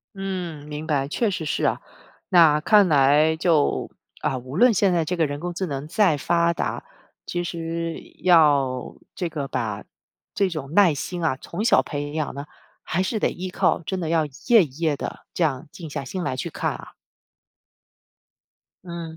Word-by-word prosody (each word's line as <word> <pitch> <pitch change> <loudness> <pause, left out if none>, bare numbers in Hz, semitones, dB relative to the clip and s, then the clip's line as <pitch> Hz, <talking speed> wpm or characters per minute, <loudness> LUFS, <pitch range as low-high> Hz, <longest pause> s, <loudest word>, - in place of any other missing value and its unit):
嗯， 180 -6 -5
明 150 +1 -6
白， 140 -3 0
确 220 +7 0
实 165 -4 -4
是 - - -1
啊， - - +1 0.5
那 160 -4 +6
看 205 +3 +5
来 150 +1 +4
就， 160 -3 +1 0.3
啊， 130 - -1
无 130 +4 -7
论 245 -2 +6
现 195 -2 +3
在 165 -3 +1
这 180 - -1
个 165 - +2
人 145 0 -4
工 175 +1 -4
智 190 - -2
能 145 -3 -4
再 180 -5 +3
发 170 +4 +2
达， 170 - -3 0.4
其 175 - -3
实 165 0 -4 0.2
要， 145 -7 +3 0.2
这 175 -2 -3
个 140 -3 -4
把 110 -5 -3 0.5
这 195 -2 +1
种 155 -2 -6
耐 195 -5 +6
心 175 +4 -4
啊， 130 -5 0
从 200 +6 -4
小 - - +5
培 145 -1 -5
养 155 -3 -3
呢， 140 +1 -6 0.4
还 180 +4 -1
是 200 +4 -1
得 - - +1
依 185 +1 -5
靠 180 - +1
真 185 +3 -4
的 165 -2 -3
要 160 -2 +2
一 145 - -14 0.2
页 230 -5 +7
一 135 -3 -12
页 155 -4 +1
地 - - -6
这 - - -2
样 140 0 -1
静 165 -3 -8
下 140 - -5
心 180 +7 -5
来 130 - -2
去 - - -4
看 - - -2
啊。 - - -11 1.9
嗯。 170 -2 -7
165 Hz, 200 characters per minute, -23 LUFS, 145-180 Hz, 1.9 s, 页